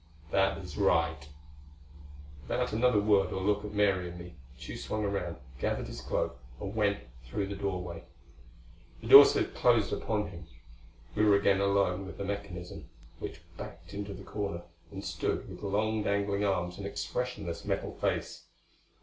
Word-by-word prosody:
"That 95 0 +3
is 90 -2 -8
right." 85 -7 +2 1.1
Without 65 - -1
another 115 0 +4
word 100 -1 +3
or - - -2
look 105 +2 +1
at 105 - -5
Mary 100 -4 +2
and 85 - -9
me, 85 0 -9 0.3
Tugh - - -7
swung 110 -1 -2
around, 100 -5 -2 0.2
gathered - - -1
his - - -7
cloak 65 - -2 0.2
and 100 - -5
went 100 -2 +2 0.2
through 100 +11 -2
the 100 +1 -5
doorway. 90 -4 -3 1.0
The - - -7
door - - +13
slid - - +1
closed 120 -4 +3
upon 105 -2 -1
him. 85 -1 -10 0.7
We 105 - +2
were 105 -1 +6
again 100 -1 +3
alone 100 -1 +2
with - - -9
the 100 - -3
mechanism, 95 -3 -6 0.3
which 80 - -6 0.2
backed 85 +3 -9
into 100 0 -5
the - - -10
corner 100 -4 -4 0.3
and 95 0 -7
stood 85 -4 -2
with - - -9
long 105 +2 0
dangling 100 0 0
arms 90 -3 0
and 100 - -4
expressionless 110 -5 -3
metal - - -2
face. - - -2
100 Hz, 160 wpm, -31 LUFS, 90-105 Hz, 1.1 s, door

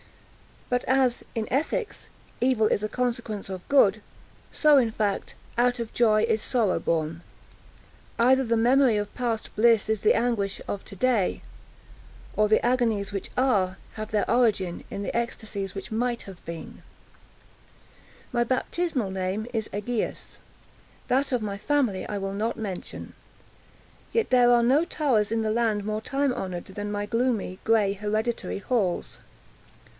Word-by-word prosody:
But 245 0 0
as, 260 -2 +2
in 225 -2 -2
ethics, 320 - -1 0.3
evil 245 -3 +3
is 205 - +1
a 215 - -2
consequence 235 -5 -2
of 185 -1 -7
good, 215 -7 +4 0.5
so, 300 -2 +5
in 245 -4 +4
fact, 210 -2 -2 0.2
out 245 0 +3
of 230 -1 -5
joy 215 -2 +4
is 220 -1 +1
sorrow 225 -7 +1
born. 160 0 -1 1.0
Either 260 +3 +4
the 230 -2 +1
memory 245 +1 +4
of 205 0 -3
past 235 -3 -2
bliss 225 -1 +4
is 220 -2 0
the 215 - +4
anguish 225 -5 0
of 200 - -4
to - - -10
day, 225 -2 +1 0.9
or 215 0 +3
the 215 +2 +3
agonies 230 -5 +1
which 200 -1 -4
are, 200 -8 +2 0.2
have 215 0 -6
their 210 -1 0
origin 210 -8 +1
in 200 - -5
the - - -4
ecstasies 215 -4 -3
which 195 +4 -7
might 240 +2 -1
have 190 -2 -12
been. 170 -1 -8 1.5
My 240 -2 +2
baptismal 255 - -1
name 190 +3 -2
is 220 -2 -2
Egaeus; 215 +3 -3 0.7
that 270 +3 +2
of 240 -3 0
my 200 -1 -4
family 255 -7 0
I 205 - -3
will 195 0 -3
not 215 +3 -2
mention. 195 -5 -6 1.0
Yet 460 - +1
there 245 -1 +6
are 240 -1 +5
no 270 +7 +4
towers 255 -11 +1
in 225 0 +1
the 215 -1 0
land 220 -2 +1
more 215 +1 -2
time 275 +2 0
honored 185 -7 -4
than 205 +2 -5
my 205 0 -2
gloomy, 230 -5 -1
gray, 215 -3 +3
hereditary 215 +2 -2
halls. 200 -5 -1
220 Hz, 150 wpm, -26 LUFS, 200-245 Hz, 1.5 s, there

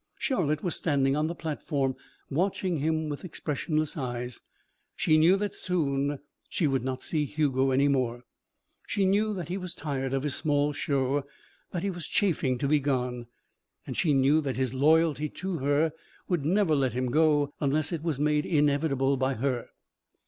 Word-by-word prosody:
Charlotte 155 - 0
was 175 - 0
standing 140 -4 +1
on 155 +1 +1
the 170 - -4
platform, 145 -4 -2 0.3
watching 180 +3 0
him 155 +2 0
with 145 -1 -5
expressionless 155 -2 -2
eyes. 125 -3 -4 0.5
She 155 - +3
knew 165 +4 +6
that 205 0 -2
soon 145 -5 0 0.3
she 170 - 0
would 135 -4 +1
not 130 0 -3
see 155 -2 0
Hugo 135 -2 +1
any 135 +2 +3
more. 125 -3 0 0.6
She 200 - +1
knew 205 +3 +2
that 175 -3 -5
he 185 - -2
was 185 -2 -6
tired 135 -3 -3
of 135 0 -1
his 145 -2 -1
small 145 -1 +1
show, 140 -1 0 0.5
that 175 -1 -4
he 200 - 0
was 175 -4 -7
chafing 150 -10 +1
to 140 - -1
be 150 +1 +4
gone; 125 -3 -1 0.6
and - - -5
she 160 - +2
knew 140 +3 +4
that 135 -4 -3
his 130 -2 0
loyalty 150 +2 +3
to 190 +1 -4
her 145 +4 +2 0.4
would 175 -6 0
never 180 -1 +3
let 135 -3 +1
him 125 0 -1
go 150 -1 +3
unless 150 +3 +1
it 165 -3 -2
was 160 -4 -1
made 150 +1 +2
inevitable 145 -3 +2
by 130 +1 0
her. 125 -1 -1
145 Hz, 175 wpm, -28 LUFS, 135-160 Hz, 0.6 s, knew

